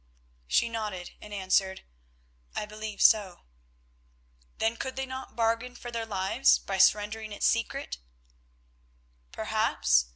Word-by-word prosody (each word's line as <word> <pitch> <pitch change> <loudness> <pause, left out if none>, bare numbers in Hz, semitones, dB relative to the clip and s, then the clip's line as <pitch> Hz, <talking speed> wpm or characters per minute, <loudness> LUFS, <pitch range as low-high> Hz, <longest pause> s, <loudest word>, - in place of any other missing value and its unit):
She 65 - +3
nodded, 210 -6 -4
and 210 - -11
answered, 190 -1 +1 0.7
"I - - -2
believe 215 0 -4
so." 200 -5 +4 1.2
"Then 225 +1 +1
could 260 +3 -5
they 265 0 -2
not 260 0 -7
bargain 230 +2 0
for 240 0 -8
their 230 -1 -3
lives 200 +6 +3
by 195 -1 -4
surrendering 210 +3 +3
its 205 - -2
secret?" 145 - 0 1.3
"Perhaps. - - +2
215 Hz, 120 wpm, -29 LUFS, 190-230 Hz, 1.3 s, so